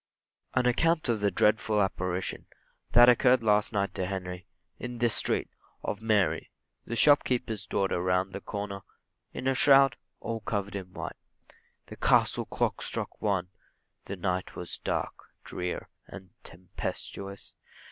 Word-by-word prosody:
AN 130 -1 +3
ACCOUNT 155 +4 +2
OF 115 -2 +1
THE 100 0 +2
DREADFUL 105 +1 +2
APPARITION 95 -2 -2 0.5
That 120 0 +9
appeared 125 0 +5
last 105 0 +3
night 100 -2 -1
to 90 - -2
Henry 90 -2 -5 0.3
in 125 -1 -5
this 120 -1 +2
street, - - 0 0.3
of 105 - -3
Mary, 110 -4 +1 0.4
the 115 - -3
shopkeeper's 120 - +3
daughter 95 -2 0
round 90 +1 0
the 100 - -5
corner, 100 -1 -5 0.5
in - - -6
a 135 - +3
shroud, 135 -1 +6 0.2
all 115 -1 -4
covered 100 -2 -3
in 95 -2 -6
white. - - -6 0.7
The - - -11
castle - - +3
clock - - -1
struck - - -4
one 95 -4 0 0.6
the 100 - -5
night 90 0 -2
was 90 - -6
dark, - - -2 0.3
drear, 90 0 -4 0.2
and 95 -2 -11
tempestuous. 95 +2 -7
100 Hz, 140 wpm, -29 LUFS, 95-115 Hz, 0.7 s, That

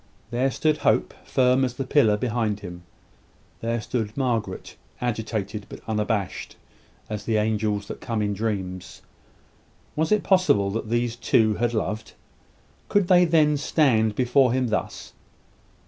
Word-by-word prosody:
There 125 +3 +1
stood 155 +3 +1
Hope, - - +1
firm 130 0 +3
as 125 -1 -1
the 135 - -3
pillar 125 -6 +3
behind 110 -3 -1
him. 90 -2 -8 0.8
There 115 +1 -1
stood 110 0 -3
Margaret, 115 -8 -2 0.2
agitated, 110 -3 -3
but - - -9
unabashed 105 -3 -2 0.5
as 105 -1 -5
the 110 -2 +1
angels 105 -1 0
that - - -7
come 115 -3 -2
in 105 0 0
dreams. 95 -4 -4 0.9
Was 160 +4 0
it 215 - +3
possible 185 - +3
that 110 +1 -4
these 120 0 0
two 110 -2 +2
had 120 +2 -1
loved? 110 0 -3 0.8
Could 205 -3 +2
they 180 -1 +6
then 155 -3 +3
stand 115 -8 +2
before 125 +1 +3
him 130 -2 0
thus? - - -3
115 Hz, 140 wpm, -24 LUFS, 105-130 Hz, 0.9 s, they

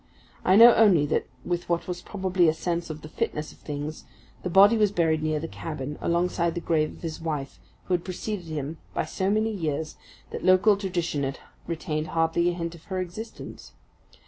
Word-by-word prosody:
I 185 - +4
know 230 +3 +10
only 190 -9 +5
that - - 0 0.2
with 175 -1 -2
what 170 -1 0
was 180 -1 -4
probably 185 -3 +1
a 155 - 0
sense 170 0 -2
of 155 -1 -7
the - - -7
fitness 155 0 -3
of - - -19
things 150 +1 -6 0.4
the 180 - -3
body 200 +5 +7
was 210 -3 +3
buried 160 -5 +1
near 155 -1 0
the 165 - -4
cabin, 150 -3 -6
alongside 170 0 0
the - - -1
grave 155 -2 +1
of - - -16
his 160 -1 -5
wife, 140 - -4 0.2
who 185 - -2
had 175 -1 +1
preceded 185 +1 -4
him 155 0 -4 0.2
by - - 0
so 190 0 -1
many 215 +2 +1
years 155 -5 -3 0.3
that - - -5
local 185 +3 +5
tradition 175 -6 -2
had 135 0 -2 0.3
retained 160 -2 -3
hardly 165 +2 +1
a - - -1
hint 170 -1 -4
of 165 -2 -14
her 190 -2 -3
existence. 185 +5 -7
170 Hz, 200 wpm, -26 LUFS, 155-185 Hz, 0.4 s, know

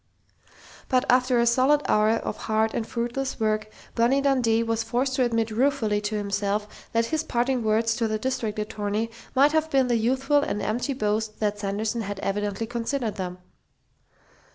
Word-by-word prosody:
But 255 -2 +2
after 250 0 +3
a 235 - +3
solid 265 +5 +3
hour 215 0 +3
of 225 +1 -1
hard 220 0 0
and 225 - -2
fruitless 240 +3 -3
work, 215 -1 0 0.2
Bonnie 240 +4 +3
Dundee 250 -5 +2
was 230 0 -1
forced 245 +4 -1
to 260 - +3
admit 230 -2 0
ruefully 225 -3 +1
to 210 +1 -2
himself 205 0 -3
that 230 0 +2
his 315 0 +1
parting 250 -3 0
words 220 +1 +2
to 230 -2 +1
the 215 0 -1
district 225 -2 -2
attorney 210 +1 -2 0.2
might 280 +3 +5
have 315 0 +1
been 265 -4 +2
the 240 - +3
youthful 265 +5 +2
and 210 - -2
empty 245 +7 -1
boast 215 -2 -2
that 210 -1 -1
Sanderson 210 +3 -2
had 205 -2 -5
evidently 205 +2 -2
considered 235 0 -3
them. 180 -1 -4
230 Hz, 170 wpm, -25 LUFS, 215-255 Hz, 0.2 s, might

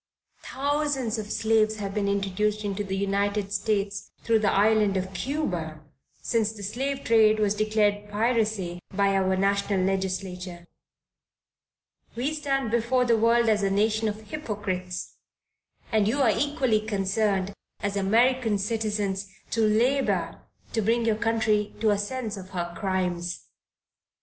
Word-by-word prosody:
Thousands 280 -5 -1
of 210 -1 -6
slaves 220 -1 +2
have 200 -2 -5
been 205 -1 0
introduced 200 +2 0
into 205 0 -2
the 195 -1 -3
United 200 +1 0
States 205 0 -1
through 225 -1 +3
the 210 -2 +2
island 210 -1 +3
of 190 +1 -3
Cuba, 180 - -3 0.4
since 220 -2 +1
the 210 -2 -10
slave 270 +7 -3
trade 220 -2 +5
was 210 -2 +2
declared 210 -1 +1
piracy 210 -5 0
by 200 0 +2
our 190 -1 +2
national 200 0 +1
legislature. 185 -2 -3 1.5
We 260 +6 -1
stand 275 -6 -1
before 235 +2 +2
the 235 -1 +4
world 230 +1 +3
as 215 -2 +3
a 195 - +1
nation 215 +2 +1
of 210 +1 -3
hypocrites, 205 -7 -5 0.7
and 215 -3 +3
you 275 +5 +2
are 225 -4 +4
equally 265 -3 +1
concerned, 200 -1 0 0.3
as 200 -1 -2
American 225 +3 +2
citizens, 205 -2 -1 0.2
to 225 - +1
labor 235 +6 +1 0.3
to 225 - +1
bring 230 +2 +1
your 225 -2 +2
country 220 -2 0
to 220 -1 +3
a 205 - +1
sense 220 0 -3
of 185 -1 -9
her 175 -2 -4
crimes. 180 -1 -2
210 Hz, 140 wpm, -26 LUFS, 195-225 Hz, 1.5 s, trade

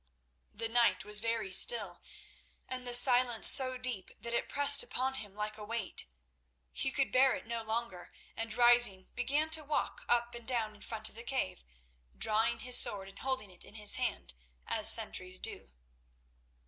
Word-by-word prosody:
The 230 +2 -5
night 235 +1 -1
was 210 0 +8
very 225 -3 -5
still 200 -3 +4 0.7
and 255 -1 -8
the 245 - -2
silence 245 -2 +5
so 255 -2 +6
deep 250 -7 -6
that 235 - -8
it 235 - -4
pressed 285 0 +6
upon 260 +1 -3
him 205 -7 -10
like 210 +1 -7
a - - -10
weight. 220 - -3 0.6
He - - -4
could 275 -1 -2
bear 260 +1 +2
it - - -11
no 230 0 -6
longer, 220 -5 -7 0.2
and 225 0 -7
rising, 240 -5 +1
began 290 +6 -3
to 315 -1 0
walk 295 0 -5
up 240 0 -1
and 235 -1 -13
down 230 -4 -2
in 210 - -20
front 220 -1 -5
of - - -18
the 230 - -11
cave, 95 - -5 0.5
drawing 220 +2 -1
his 250 0 +4
sword 195 -1 -2
and 195 - -17
holding 260 -7 -5
it 180 - -5
in - - -15
his 210 -2 +3
hand 245 - -4 0.3
as - - +4
sentries 185 0 -1
do. - - -6
230 Hz, 175 wpm, -30 LUFS, 210-250 Hz, 0.7 s, was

